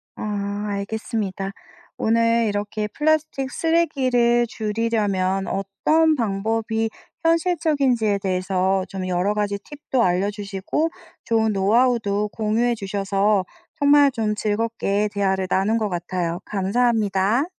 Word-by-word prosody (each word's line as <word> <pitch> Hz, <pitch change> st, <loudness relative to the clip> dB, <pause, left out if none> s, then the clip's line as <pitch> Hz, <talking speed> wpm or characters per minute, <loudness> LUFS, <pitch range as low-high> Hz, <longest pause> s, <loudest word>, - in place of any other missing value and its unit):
아. 200 Hz, -1 st, -3 dB, 0.2 s
알겠습니다. 200 Hz, -1 st, -3 dB, 0.5 s
오늘 230 Hz, 0 st, +2 dB
이렇게 210 Hz, +1 st, -2 dB
플라스틱 305 Hz, -1 st, 0 dB
쓰레기를 255 Hz, -8 st, +2 dB
줄이려면 210 Hz, -4 st, -1 dB
어떤 310 Hz, -, +1 dB
방법이 225 Hz, 0 st, -1 dB, 0.3 s
현실적인지에 305 Hz, -, +2 dB
대해서 185 Hz, 0 st, 0 dB
좀 190 Hz, -2 st, -4 dB
여러 185 Hz, +3 st, +1 dB
가지 205 Hz, -1 st, -1 dB
팁도 275 Hz, -3 st, -2 dB
알려 185 Hz, +3 st, +1 dB
주시고 205 Hz, +9 st, -2 dB, 0.3 s
좋은 220 Hz, -1 st, +1 dB
노하우도 210 Hz, 0 st, +2 dB
공유해 225 Hz, +2 st, +1 dB
주셔서 195 Hz, -1 st, 0 dB, 0.3 s
정말 285 Hz, -1 st, +5 dB
좀 215 Hz, -3 st, -1 dB
즐겁게 210 Hz, -1 st, 0 dB
대화를 190 Hz, -2 st, 0 dB
나눈 205 Hz, +4 st, +2 dB
것 215 Hz, -2 st, 0 dB
같아요. 175 Hz, -1 st, -3 dB
감사합니다. 210 Hz, +3 st, +1 dB
210 Hz, 275 characters per minute, -22 LUFS, 195-240 Hz, 0.5 s, 정말